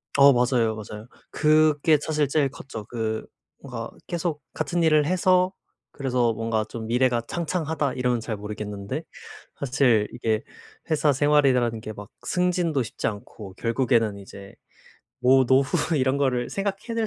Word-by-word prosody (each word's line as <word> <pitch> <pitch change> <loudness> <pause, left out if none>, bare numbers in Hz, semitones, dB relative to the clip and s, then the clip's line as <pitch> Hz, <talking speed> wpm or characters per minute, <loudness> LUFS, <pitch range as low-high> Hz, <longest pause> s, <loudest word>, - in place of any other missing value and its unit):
어 140 -1 +7
맞아요, 120 -3 +2
맞아요. 105 +1 -9 0.2
그게 155 0 +3
사실 150 -2 0
제일 140 -1 +1
컸죠. 120 -5 -9
그 110 -2 -3 0.4
뭔가 - - -6 0.2
계속 170 -3 -2
같은 160 +3 -1
일을 155 -2 +4
해서 185 +2 +3 0.4
그래서 125 -4 0
뭔가 115 0 -1
좀 110 -2 -6
미래가 120 0 +2
창창하다 160 -5 -2
이러면 125 -2 0
잘 110 -1 -4
모르겠는데 105 -1 -5 0.6
사실 125 -6 +2
이게 110 -2 -1 0.5
회사 155 -2 +3
생활이라는 130 -5 +2
게 110 - -6
막 105 0 -10 0.2
승진도 180 -5 +1
쉽지 115 - -4
않고 100 -2 -7
결국에는 115 -3 +1
이제 100 0 -12 0.7
뭐 130 +1 +5
노후 135 +5 +2
이런 130 0 +2
거를 125 -3 0
생각해 200 +3 -3
낼 225 -1 0
130 Hz, 300 characters per minute, -25 LUFS, 115-155 Hz, 0.7 s, 어